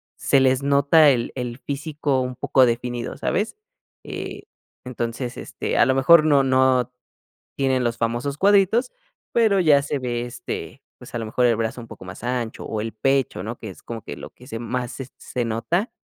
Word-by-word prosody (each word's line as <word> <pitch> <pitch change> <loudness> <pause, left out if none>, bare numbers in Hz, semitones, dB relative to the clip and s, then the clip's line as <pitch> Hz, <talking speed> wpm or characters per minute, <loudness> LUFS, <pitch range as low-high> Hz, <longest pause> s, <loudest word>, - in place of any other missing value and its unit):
se 135 - +3
les 130 0 +3
nota 140 +2 +5
el 120 -4 +1
el 125 -2 -4
físico 145 -1 -2
un 125 0 -3
poco 130 0 +3
definido, 120 0 -3
¿sabes? 210 +4 -1 0.5
Eh, - - -6 0.4
entonces, 120 0 -4
este, - - -4
a - - +6
lo 130 - +2
mejor 155 +5 +6
no 145 -3 +4
no 130 -1 +3 0.6
tienen 130 -2 +1
los 120 -1 -1
famosos 120 +5 -1
cuadritos, 200 - +3 0.4
pero 220 -5 +3
ya 150 -5 +5
se 140 0 -3
ve, 120 -2 -2
este, 120 +1 -7 0.2
pues, 125 - -13
a - - -1
lo 115 - -4
mejor 125 +3 +2
el 120 - +4
brazo 115 +2 -2
un 115 - -9
poco - - -11
más 95 +4 -9
ancho, 120 -2 -3
o 110 - -3
el 110 +1 -4
pecho, 135 -5 0
¿no?, 115 +2 -5
que 110 - -7
es 95 - -14
como 115 -2 -6
que - - -7
lo - - -9
que 125 - -17
se 115 - -5
más 120 +1 -3
se 130 0 -7
se 125 - -3
nota, 115 - -1
125 Hz, 195 wpm, -23 LUFS, 120-140 Hz, 0.6 s, a